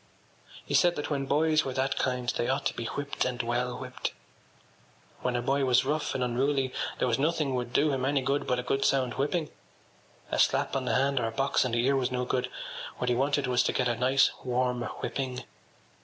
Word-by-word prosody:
He -, -, -5 dB
said 175 Hz, -1 st, +4 dB
that 145 Hz, -, -4 dB
when 135 Hz, -2 st, -1 dB
boys 155 Hz, +1 st, +3 dB
were 130 Hz, -, -4 dB
that 135 Hz, +1 st, 0 dB
kind 125 Hz, -1 st, -1 dB
they 120 Hz, -, -1 dB
ought 135 Hz, +1 st, 0 dB
to -, -, +1 dB
be 115 Hz, -, -5 dB
whipped 140 Hz, +3 st, -2 dB
and 125 Hz, -1 st, -2 dB
well 120 Hz, +1 st, -1 dB
whipped. 130 Hz, -1 st, -5 dB, 1.1 s
When 125 Hz, -1 st, -1 dB
a 120 Hz, -, -1 dB
boy 135 Hz, +2 st, +1 dB
was 130 Hz, 0 st, +3 dB
rough 150 Hz, +2 st, -1 dB
and 130 Hz, -, 0 dB
unruly 130 Hz, +2 st, 0 dB, 0.2 s
there -, -, +1 dB
was 120 Hz, +1 st, +1 dB
nothing 150 Hz, -2 st, +1 dB
would 125 Hz, -1 st, -2 dB
do 145 Hz, +3 st, +3 dB
him 130 Hz, -2 st, -1 dB
any 135 Hz, 0 st, +1 dB
good 140 Hz, +2 st, 0 dB
but 125 Hz, -, +1 dB
a 125 Hz, -, -2 dB
good 135 Hz, +2 st, 0 dB
sound 130 Hz, -3 st, +2 dB
whipping. 150 Hz, +5 st, -1 dB, 0.8 s
A -, -, 0 dB
slap -, -, +2 dB
on 135 Hz, -1 st, -1 dB
the -, -, +1 dB
hand 135 Hz, +1 st, +2 dB
or 115 Hz, -, 0 dB
a -, -, -3 dB
box 135 Hz, +3 st, +1 dB
on 125 Hz, -, -1 dB
the 120 Hz, +1 st, +2 dB
ear 140 Hz, +1 st, +3 dB
was 130 Hz, -2 st, +1 dB
no 125 Hz, 0 st, -1 dB
good: 125 Hz, 0 st, -1 dB, 0.5 s
what 125 Hz, -, -1 dB
he -, -, +2 dB
wanted 140 Hz, +2 st, +1 dB
was 125 Hz, -1 st, +2 dB
to -, -, 0 dB
get 125 Hz, -, +1 dB
a 120 Hz, -, +1 dB
nice 130 Hz, +3 st, +3 dB
warm 125 Hz, -1 st, 0 dB
whipping. 125 Hz, +2 st, -4 dB
130 Hz, 225 wpm, -28 LUFS, 125-140 Hz, 1.1 s, said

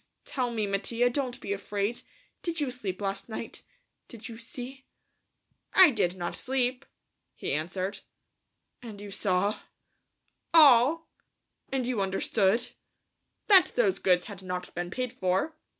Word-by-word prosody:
Tell 255 Hz, -2 st, -1 dB
me, 225 Hz, -3 st, -1 dB
Mattia. 230 Hz, +5 st, +1 dB
Don't 255 Hz, -2 st, -2 dB
be 200 Hz, -, -3 dB
afraid. 200 Hz, +3 st, -2 dB, 0.4 s
Did 340 Hz, -1 st, -2 dB
you 285 Hz, -4 st, -1 dB
sleep 200 Hz, -7 st, -5 dB
last 195 Hz, +3 st, -3 dB
night? 225 Hz, +1 st, -6 dB, 0.5 s
Did 225 Hz, -2 st, -10 dB
you 225 Hz, -1 st, -9 dB
see?" 255 Hz, +3 st, -7 dB, 0.9 s
"I 370 Hz, -5 st, +9 dB
did 190 Hz, -6 st, 0 dB
not 175 Hz, -1 st, -3 dB
sleep," 255 Hz, 0 st, -1 dB, 0.5 s
he -, -, -3 dB
answered. 185 Hz, +5 st, -3 dB, 0.8 s
"And 220 Hz, -4 st, -9 dB
you 205 Hz, 0 st, -8 dB
saw...?" 195 Hz, +1 st, 0 dB, 1.0 s
"All." 295 Hz, +1 st, +6 dB, 0.6 s
"And 265 Hz, -2 st, 0 dB
you 240 Hz, -4 st, -1 dB
understood?" 195 Hz, +3 st, +1 dB, 0.8 s
"That 385 Hz, -4 st, +6 dB
those 200 Hz, -6 st, +2 dB
goods 180 Hz, -2 st, +3 dB
had 200 Hz, -3 st, -9 dB
not 180 Hz, -1 st, -5 dB
been 175 Hz, 0 st, -4 dB
paid 250 Hz, +5 st, -3 dB
for. 190 Hz, -, 0 dB
225 Hz, 135 wpm, -28 LUFS, 195-255 Hz, 1.0 s, I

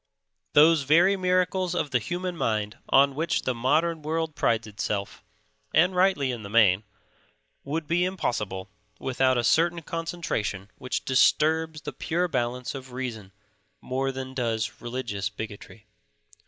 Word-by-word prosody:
Those 155 Hz, +1 st, +6 dB
very 170 Hz, +8 st, +4 dB
miracles 185 Hz, -1 st, +1 dB
of 150 Hz, -5 st, -1 dB
the 125 Hz, -, +3 dB
human 180 Hz, +7 st, -3 dB
mind 105 Hz, -7 st, -1 dB
on 140 Hz, +1 st, +5 dB
which 160 Hz, +5 st, -1 dB
the 130 Hz, -, 0 dB
modern 155 Hz, +7 st, +1 dB
world 160 Hz, +1 st, -2 dB
prides 115 Hz, -5 st, +1 dB
itself, 105 Hz, -1 st, -4 dB, 0.5 s
and 180 Hz, +4 st, +4 dB
rightly 180 Hz, -8 st, +3 dB
in 120 Hz, -3 st, -5 dB
the 100 Hz, -, -8 dB
main, 105 Hz, -3 st, +4 dB, 0.8 s
would 155 Hz, +3 st, -3 dB
be 170 Hz, +3 st, +1 dB
impossible 105 Hz, -, -2 dB, 0.3 s
without 130 Hz, -1 st, +1 dB
a 120 Hz, -, +1 dB
certain 170 Hz, +6 st, +2 dB
concentration 155 Hz, -, -3 dB
which 125 Hz, -, -3 dB
disturbs 155 Hz, +4 st, +2 dB
the 150 Hz, -, -6 dB
pure 170 Hz, +7 st, -1 dB
balance 125 Hz, -4 st, -2 dB
of 130 Hz, -2 st, -9 dB
reason 115 Hz, -6 st, -5 dB, 0.5 s
more 135 Hz, +1 st, -2 dB
than 130 Hz, 0 st, -6 dB
does 115 Hz, -4 st, -2 dB
religious 120 Hz, -5 st, -3 dB
bigotry. 105 Hz, +1 st, -9 dB
135 Hz, 140 wpm, -26 LUFS, 115-165 Hz, 0.8 s, Those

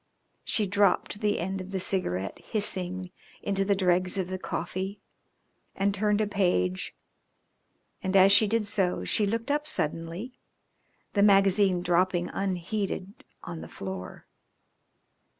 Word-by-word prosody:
She 215 Hz, -, +1 dB
dropped 205 Hz, +1 st, +1 dB
the 210 Hz, -1 st, +1 dB
end 190 Hz, +2 st, -3 dB
of 185 Hz, -, -9 dB
the 190 Hz, -1 st, -2 dB
cigarette 100 Hz, -, -2 dB
hissing 185 Hz, -3 st, -1 dB, 0.3 s
into 195 Hz, -1 st, +1 dB
the 200 Hz, 0 st, +2 dB
dregs 185 Hz, 0 st, +1 dB
of 185 Hz, -2 st, -2 dB
the 185 Hz, 0 st, -4 dB
coffee 190 Hz, +3 st, -4 dB, 0.8 s
and 195 Hz, +1 st, +1 dB
turned 210 Hz, +1 st, +1 dB
a -, -, +2 dB
page, 175 Hz, -, 0 dB, 1.1 s
and, 190 Hz, +1 st, -2 dB
as 195 Hz, 0 st, +7 dB
she 210 Hz, +2 st, +6 dB
did 225 Hz, +1 st, +1 dB
so, 195 Hz, -4 st, 0 dB
she 210 Hz, -, +2 dB
looked 230 Hz, +6 st, -2 dB
up 295 Hz, +1 st, 0 dB
suddenly, 165 Hz, -, -2 dB, 0.7 s
the 200 Hz, -, +2 dB
magazine 195 Hz, -2 st, +4 dB
dropping 175 Hz, 0 st, +1 dB
unheeded 195 Hz, +2 st, -3 dB, 0.2 s
on 170 Hz, -2 st, -7 dB
the -, -, -8 dB
floor. 95 Hz, -2 st, -7 dB
190 Hz, 135 wpm, -28 LUFS, 180-205 Hz, 1.1 s, as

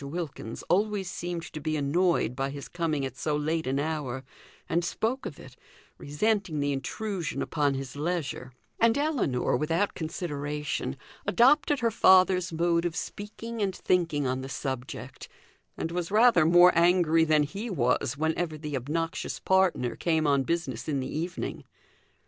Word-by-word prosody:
Wilkins 140 Hz, -6 st, -5 dB
always 200 Hz, 0 st, 0 dB
seemed 175 Hz, -1 st, -4 dB
to 155 Hz, -, -5 dB
be 155 Hz, +1 st, -1 dB
annoyed 150 Hz, -3 st, +1 dB
by 135 Hz, +1 st, -1 dB
his 140 Hz, 0 st, -7 dB
coming 155 Hz, -5 st, -1 dB
at 135 Hz, -, -6 dB
so 150 Hz, -1 st, -1 dB
late 160 Hz, +1 st, -1 dB
an 135 Hz, +1 st, 0 dB
hour, 145 Hz, -4 st, -2 dB, 0.4 s
and 170 Hz, +1 st, +1 dB
spoke 230 Hz, +8 st, -2 dB
of -, -, -9 dB
it, -, -, -13 dB, 0.4 s
resenting 175 Hz, +2 st, 0 dB
the 145 Hz, 0 st, 0 dB
intrusion 170 Hz, +5 st, -3 dB
upon 145 Hz, -3 st, 0 dB
his 135 Hz, 0 st, -6 dB
leisure; 150 Hz, -4 st, -3 dB, 0.3 s
and 230 Hz, +1 st, +4 dB
Ellinor, 270 Hz, -, +1 dB
without 165 Hz, +9 st, 0 dB
consideration, 150 Hz, -, -3 dB, 0.3 s
adopted 280 Hz, -, +4 dB
her 230 Hz, -1 st, +2 dB
father's 185 Hz, -3 st, +5 dB
mode 170 Hz, +1 st, +1 dB
of 175 Hz, -1 st, -2 dB
speaking 220 Hz, +3 st, -6 dB
and 195 Hz, -2 st, 0 dB
thinking 165 Hz, -6 st, +1 dB
on 130 Hz, 0 st, -1 dB
the 135 Hz, -, -7 dB
subject, 130 Hz, -2 st, -5 dB, 0.5 s
and 165 Hz, -, -3 dB
was 175 Hz, -1 st, -2 dB
rather 210 Hz, -6 st, +5 dB
more 175 Hz, +1 st, +7 dB
angry 170 Hz, -1 st, +4 dB
than 155 Hz, -2 st, +3 dB
he 200 Hz, +10 st, -5 dB
was 135 Hz, -, 0 dB
whenever 160 Hz, +1 st, -1 dB
the 150 Hz, -1 st, -5 dB
obnoxious 160 Hz, +6 st, -3 dB
partner 190 Hz, -10 st, +2 dB
came 160 Hz, -2 st, +1 dB
on 140 Hz, -2 st, +3 dB
business 170 Hz, +5 st, -2 dB
in 140 Hz, -2 st, 0 dB
the 130 Hz, +2 st, -4 dB
evening. 170 Hz, +4 st, -4 dB
165 Hz, 155 wpm, -28 LUFS, 145-185 Hz, 0.5 s, more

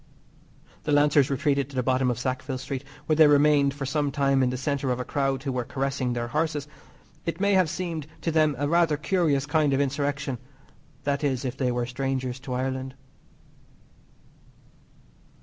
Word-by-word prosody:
The 150 Hz, -, -3 dB
lancers 145 Hz, -1 st, +4 dB
retreated 140 Hz, -1 st, 0 dB
to 140 Hz, -, -11 dB
the 125 Hz, -, 0 dB
bottom 130 Hz, 0 st, +2 dB
of 120 Hz, -, -1 dB
Sackville 130 Hz, +1 st, -3 dB
Street, 130 Hz, +1 st, -5 dB, 0.2 s
where 155 Hz, -, +2 dB
they 155 Hz, 0 st, +7 dB
remained 145 Hz, -1 st, +4 dB
for 140 Hz, -2 st, -4 dB
some 145 Hz, +1 st, 0 dB
time 140 Hz, -1 st, +2 dB
in 130 Hz, -, +3 dB
the 125 Hz, -, -3 dB
centre 140 Hz, +1 st, -1 dB
of 125 Hz, 0 st, 0 dB
a 125 Hz, -, -3 dB
crowd 135 Hz, -2 st, -1 dB
who 135 Hz, -, -2 dB
were 125 Hz, -1 st, -1 dB
carressing 135 Hz, -1 st, -2 dB
their 120 Hz, 0 st, -3 dB
horses. 150 Hz, 0 st, -1 dB, 0.6 s
It 165 Hz, +1 st, -2 dB
may 200 Hz, +1 st, +2 dB
have 185 Hz, -4 st, +4 dB
seemed 170 Hz, -3 st, -4 dB
to 165 Hz, -, -1 dB
them 155 Hz, -2 st, +3 dB
a 145 Hz, +2 st, 0 dB
rather 165 Hz, -1 st, +3 dB
curious 150 Hz, -3 st, +1 dB
kind 145 Hz, -1 st, +2 dB
of 135 Hz, -, +2 dB
insurrection 140 Hz, -2 st, -1 dB, 0.6 s
that 140 Hz, +1 st, -1 dB
is, 135 Hz, -2 st, 0 dB
if 125 Hz, 0 st, -3 dB
they 130 Hz, -2 st, 0 dB
were 120 Hz, 0 st, -1 dB
strangers 130 Hz, 0 st, -3 dB
to 130 Hz, -1 st, -6 dB
Ireland. 130 Hz, +1 st, -3 dB
140 Hz, 180 wpm, -26 LUFS, 130-150 Hz, 0.6 s, they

